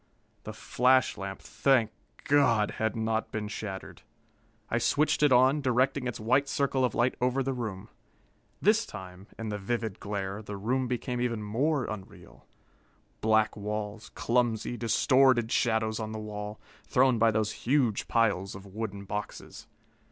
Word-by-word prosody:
The - - -5
flash 130 0 +2
lamp, 95 0 -7
thank 125 -6 +2 0.3
God! 125 -7 +3
had 110 -1 0
not 110 0 -1
been 105 -1 -3
shattered. 105 -2 -7 0.7
I 115 - 0
switched 150 +4 +2
it 150 -2 +5
on, 130 +4 +5
directing 130 +1 +1
its 125 - -4
white 130 +6 +2
circle 135 -1 0
of 125 - 0
light 125 +2 +2
over 125 +2 +1
the 135 +1 -1
room. 110 -5 -5 0.7
This 215 +3 +3
time, 95 +1 -10
in 115 -1 -4
the 105 0 -3
vivid 110 0 -3
glare, 100 0 -4
the 105 -1 -7
room 125 +6 0
became 125 0 -2
even 115 -3 -1
more 130 +6 0
unreal. 100 -3 -10 0.7
Black 110 0 +3
walls, 105 +1 -5
clumsy, 120 -1 0
distorted 120 +1 +3
shadows 110 -2 +1
on 110 -1 -4
the - - -4
wall, 105 0 -6 0.3
thrown 130 -2 +3
by 115 +1 +5
those 110 -1 0 0.2
huge 125 -6 +2
piles 100 -5 +1
of 95 +1 -10
wooden 100 0 -6
boxes. 105 +2 -6
115 Hz, 150 wpm, -29 LUFS, 105-130 Hz, 0.7 s, it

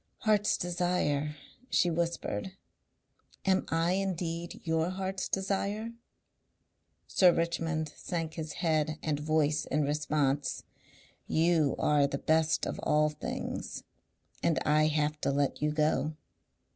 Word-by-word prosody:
"Heart's 210 -1 +3
desire," 175 -5 0 0.3
she 175 - +3
whispered. 170 - -2 0.9
"Am 190 -1 +2
I 165 +1 +2
indeed 175 -3 -2
your 160 +1 +1
heart's 190 0 -3
desire?" 200 +3 -1 1.1
Sir 180 -2 +5
Richmond 165 -2 -1
sank 165 -3 -4
his 155 -2 -5
head 155 -1 +1
and 150 -2 0
voice 155 0 +1
in 150 +2 0
response. 145 -1 0 0.6
"You 160 -3 +3
are 145 -1 +3
the 140 - -3
best 160 +2 +2
of - - -4
all 150 0 +3
things. 150 0 -5 0.6
And 165 - +2
I 155 +1 +4
have 150 0 0
to - - +1
let 140 0 0
you 150 - +2
go." 155 0 +1
160 Hz, 120 wpm, -30 LUFS, 150-175 Hz, 1.1 s, Sir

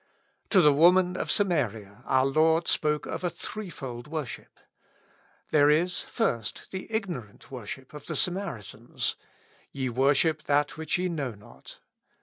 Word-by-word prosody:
To 190 - +6
the 150 -3 +6
woman 180 +4 +5
of - - -3
Samaria 115 - 0
our 130 0 +3
Lord 160 +4 +3
spoke 150 -1 +1
of - - -5
a 175 - +1
threefold 140 - -7
worship. 150 -5 -6 0.9
There 145 -1 +5
is 175 +4 +2
first, 120 - -2
the 190 +3 -6
ignorant 175 - -4
wor 125 -6 -7
ship 130 +5 -8
of 150 -1 -10
the 160 - -2
Samaritans: 175 - -2 0.6
"Ye 130 -2 -2
worship 140 +5 +2
that 145 0 +2
which 160 0 -1
ye 180 +1 0
know 140 -9 -3
not." 100 - -15
150 Hz, 140 wpm, -28 LUFS, 130-175 Hz, 0.9 s, To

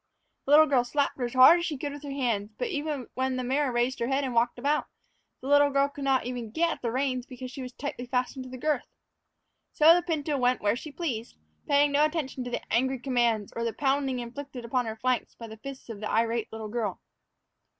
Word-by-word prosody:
The 275 - -2
little 310 +1 +9
girl 270 -5 +3
slapped 280 +3 0
her 245 - 0
as 240 - -6
hard 260 +7 +8
as 340 - -2
she 300 - -3
could 285 +2 -4
with 290 - -9
her 290 - -7
hands; 230 -7 -2
but, - - -2
even 295 - -3
when 260 0 -1
the 255 - -2
mare 265 +2 +1
raised 240 +2 0
her 235 - 0
head 270 +2 +1
and 260 -2 -2
walked 235 +1 +2
about, 285 +4 0 0.5
the 265 - -7
little 285 0 +5
girl 275 0 +2
could 285 0 -8
not 270 -1 +3
get 250 +7 -1
at - - -6
the 235 - -1
reins 255 -1 -1
because 255 0 -8
she 270 - -7
was 250 -1 -6
tightly 250 -2 -5
fastened 255 +1 -2
to - - -9
the 255 - -7
girth. 295 0 -1 0.9
So 315 +2 +7
the 350 - +3
pinto 305 -4 -1
went 250 0 +2
where 205 +1 +1
she 300 +5 -8
pleased, 250 -8 -4 0.3
paying 290 -1 +4
no 285 +1 +4
attention 305 -5 -1
to 245 - -5
angry 260 +3 +2
commands, 240 -5 0
or - - -4
to 230 - -1
the 230 - -1
pounding 270 -2 0
inflicted 250 +1 -7
upon 245 0 0
her 220 - -4
flanks 250 +1 -1
by 230 - -9
the 220 0 -10
fists 270 +4 -9
of 225 -3 -7
the 215 - -4
irate 230 0 0
little 220 -1 -6
girl. 215 -3 -3
255 Hz, 235 wpm, -28 LUFS, 240-285 Hz, 0.9 s, little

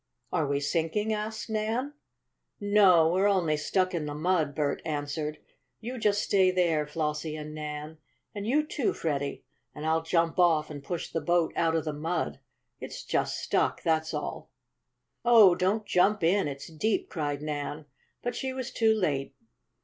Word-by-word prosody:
"Are 160 -5 +1
we 140 0 0
sinking?" 165 +9 0
asked 215 +1 -4
Nan. 225 +6 -1 0.7
"No, 200 -5 +5
we're 190 +3 +3
only 180 -6 +2
stuck 185 +5 0
in 160 -4 -2
the 145 - -4
mud," 155 -3 0
Bert 145 -2 -1
answered. 150 0 -3 0.4
"You 245 +3 -6
just 205 -1 +2
stay 190 -2 +4
there, 170 -5 +1
Flossie 150 0 -2
and 150 0 -7
Nan, 150 0 -6 0.3
and 205 0 -5
you, 300 +5 +2
too, 290 -4 -1
Freddie, 140 -3 -3 0.3
and 150 - -6
I'll 160 +1 +2
jump 165 +1 0
off 160 -4 +3
and 145 -2 -8
push 170 +3 -4
the 165 - -1
boat 175 -1 +1
out 165 -1 +2
of 160 - 0
the 155 - -2
mud. 150 - -2 0.4
It's - - -7
just - - -1
stuck, - - 0
that's 160 -1 +1
all." - - -5 0.7
"Oh, 225 -6 +7
don't 190 +4 0
jump 195 +2 +2
in 185 +1 +3
it's 140 -1 -6
deep!" 170 +7 -1
cried 145 -3 -3
Nan. 150 0 -4 0.4
But 245 - -2
she 265 -1 -3
was 260 -2 -5
too 220 -1 +3
late. 140 -9 -1
165 Hz, 165 wpm, -28 LUFS, 150-205 Hz, 0.7 s, Oh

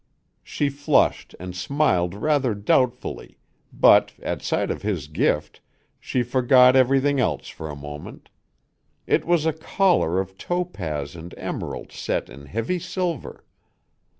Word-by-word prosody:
She 145 - -1
flushed 145 +1 +1
and 90 0 -7
smiled 90 - +1
rather 130 0 +1
doubtfully, 120 +5 0 0.3
but, - - +5
at - - -4
sight - - -1
of - - -5
his 100 -8 -2
gift, 75 0 -1 0.4
she 125 - -1
forgot 125 +1 +5
everything 135 +2 +3
else 80 - -1
for 80 - -8
a 75 - -6
moment. 75 +1 -10 0.7
It - - +1
was 170 -2 +2
a 160 - +2
collar 160 - +1
of 95 0 -5
topaz 85 - -3
and 85 +1 -10
emerald - - -5
set - - -3
in 70 +2 -12
heavy 115 - -2
silver. 175 -4 -4
120 Hz, 130 wpm, -23 LUFS, 85-145 Hz, 0.7 s, but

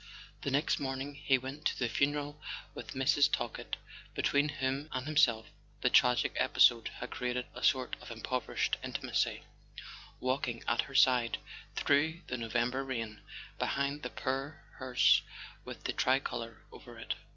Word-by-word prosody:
The - - -2
next 140 +3 +1
morning 135 +1 -3
he 140 -1 +2
went 135 +4 -7
to - - +1
the 125 - +1
funeral 145 +3 0 0.3
with - - -8
Mrs. 145 +2 +4
Talkett—between 140 +4 -2
whom 140 +1 -2
and 130 0 -3
himself 125 -7 +3 0.4
the 125 - +2
tragic 125 -1 +4
episode 115 -2 +5
had 125 - -7
created 125 0 -2
a - - -8
sort 130 -3 +2
of - - -10
improvised 115 +1 -1
intimacy—walking 130 -2 -3
at 120 - +3
her 135 - -10
side 125 -3 +4 0.4
through 160 +4 +2
the 125 - -3
November 120 +3 0
rain, 115 -5 -4 0.4
behind 140 +1 0
the 125 - -4
poor 135 +5 -3
hearse 130 -2 +4 0.4
with - - -8
the - - -1
tricolour 125 -3 0
over - - -12
it. - - -3
130 Hz, 140 wpm, -32 LUFS, 125-140 Hz, 0.4 s, episode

